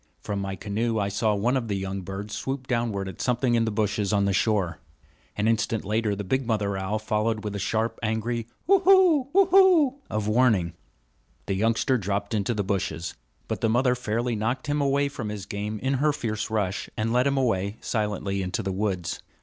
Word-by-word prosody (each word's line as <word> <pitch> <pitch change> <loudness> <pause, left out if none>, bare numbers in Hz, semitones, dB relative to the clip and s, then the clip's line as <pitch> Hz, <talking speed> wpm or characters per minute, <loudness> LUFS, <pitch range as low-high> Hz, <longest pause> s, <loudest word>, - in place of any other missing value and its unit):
From 100 -1 -3
my 95 -1 -3
canoe 110 +3 -1
I 100 -1 0
saw 105 +1 +1
one 120 +6 +1
of 125 -3 -1
the 100 - -1
young 95 0 -3
birds 100 +3 -6
swoop 135 -1 -3
downward 115 -6 -1
at 95 - -7
something 125 0 +1
in 115 -1 +3
the 110 - -1
bushes 105 -1 0
on 100 -1 +2
the 100 - +1
shore. 95 -5 +1 0.6
An 105 +1 +1
instant 115 -1 0
later 105 0 0
the 105 - -4
big 130 +5 -1
mother 105 -3 0
owl 95 +2 -1
followed 110 0 -1
with 105 -1 -4
a - - -3
sharp, 110 +4 -1
angry 115 +1 -2 0.2
hoo 395 +1 +5
hoo 360 -7 +5
hoo 390 +4 +5
hoo! 365 -9 +5 0.2
of 105 -1 -2
warning. 105 -7 +3 0.7
The - - -1
youngster 115 +5 +1
dropped 100 +1 -2
into 105 +2 0
the 105 - 0
bushes; 95 -4 -2 0.3
but - - -3
the 115 - +2
mother 125 +2 +3
fairly 120 0 -1
knocked 115 +5 -2
him 145 0 0
away 140 0 +2
from 130 -6 -5
his 105 -2 -5
game 105 +2 -4
in 130 +5 -1
her 150 0 +4
fierce 110 -6 -3
rush, 100 -3 -1
and 115 +2 0
led 125 +2 +3
him 140 0 +1
away 105 -5 0
silently 105 -3 -2
into 90 -1 -2
the 95 - -2
woods. 95 -3 -2
110 Hz, 205 wpm, -26 LUFS, 100-125 Hz, 0.7 s, hoo